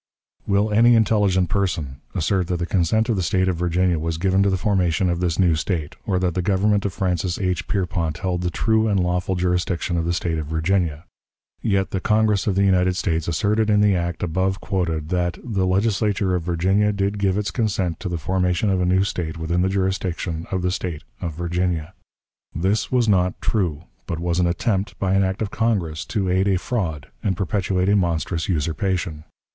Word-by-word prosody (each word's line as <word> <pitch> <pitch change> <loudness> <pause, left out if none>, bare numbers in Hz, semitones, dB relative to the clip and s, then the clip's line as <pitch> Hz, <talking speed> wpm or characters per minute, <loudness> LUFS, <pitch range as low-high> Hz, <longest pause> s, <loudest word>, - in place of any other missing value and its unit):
Will 100 +2 +2
any 115 +3 +5
intelligent 105 -5 +3
person 80 -9 -1
assert 90 +1 0
that 90 -1 -1
the 85 - -2
consent 100 +5 +1
of 115 - +1
the 95 - 0
State 95 +2 +1
of 90 -3 0
Virginia 90 0 +1
was 80 0 -2
given 95 +2 +2
to 100 - +3
the 95 - +1
formation 90 -2 +1
of 85 - -1
this 85 -3 0
new 90 -3 +4
State, 80 -1 -2
or 95 -3 +1
that 90 -2 0
the 90 - -1
government 100 +2 +1
of 100 - -1
Francis 90 -1 -1
H. 90 -3 -1
Pierpont 85 -5 -1
held 90 -1 -2
the 90 - 0
true 110 +5 +1
and 100 -2 +2
lawful 90 +1 0
jurisdiction 90 -1 0
of 85 - 0
the 85 - 0
State 85 -2 -1
of 75 - -5
Virginia? 80 0 0 0.6
Yet 95 -3 0
the 95 - -1
Congress 105 0 +2
of 100 - +1
the 100 - +3
United 95 -1 +3
States 80 -4 -1
asserted 105 +6 +1
in 105 -1 +4
the 105 -1 +4
act 85 -1 -2
above 95 +3 0
quoted 85 -6 -2
that 90 -1 0
"the 100 -6 -1
Legislature 100 0 +1
of 90 - 0
Virginia 95 +5 +1
did 100 0 -1
give 100 -1 +1
its 105 -1 -1
consent 95 -8 -1
to 95 - -4
the 85 - -2
formation 90 +4 0
of 95 -1 +1
a 90 - +1
new 95 +1 +3
State 85 -4 -3
within 85 +2 -1
the 95 - +2
jurisdiction 95 -3 -2
of 95 -2 -2
the 90 - +1
State 90 -4 -4 0.2
of 80 -3 -4
Virginia." 85 0 -2 0.6
This 95 +6 0
was 125 -3 +2
not 90 -3 +2
true, 85 -8 -1 0.2
but 85 - -3
was 85 +1 -1
an 90 - +3
attempt, 95 +3 -1
by 95 -1 0
an 95 0 +3
act 95 +3 -1
of 105 - -4
Congress, 95 -9 -1
to 100 -4 -1
aid 95 +2 +2
a 95 -2 +3
fraud 90 - -3
and 95 -4 -1
perpetuate 95 -1 0
a 100 - +4
monstrous 85 -2 -1
usurpation. 85 0 -1
90 Hz, 205 wpm, -22 LUFS, 85-100 Hz, 0.6 s, any